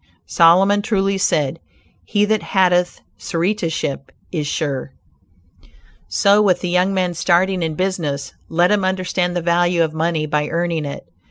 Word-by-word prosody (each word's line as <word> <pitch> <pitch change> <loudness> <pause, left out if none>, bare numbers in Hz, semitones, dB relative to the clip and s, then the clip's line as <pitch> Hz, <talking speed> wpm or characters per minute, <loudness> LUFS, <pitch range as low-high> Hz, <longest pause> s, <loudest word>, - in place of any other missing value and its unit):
Solomon 180 - +4
truly 195 -2 0
said 150 -4 0 0.4
"he 205 0 +1
that 215 0 0
hateth 180 -2 +1 0.2
suretiship 165 -6 -2 0.2
is 155 -4 -3
sure." 140 -3 -3 1.1
So 200 +1 +3
with 185 -4 +2
the 180 - -3
young 180 +2 +2
man 185 -2 -1
starting 180 +2 +1
in 160 -2 -2
business; 165 -6 -3 0.2
let 175 +3 +2
him 205 -2 +2
understand 185 -1 -1
the 175 - -2
value 175 0 +2
of 160 -1 -3
money 160 -1 -1
by 150 0 -1
earning 170 -2 -1
it. 140 - -7
175 Hz, 145 wpm, -19 LUFS, 160-190 Hz, 1.1 s, Solomon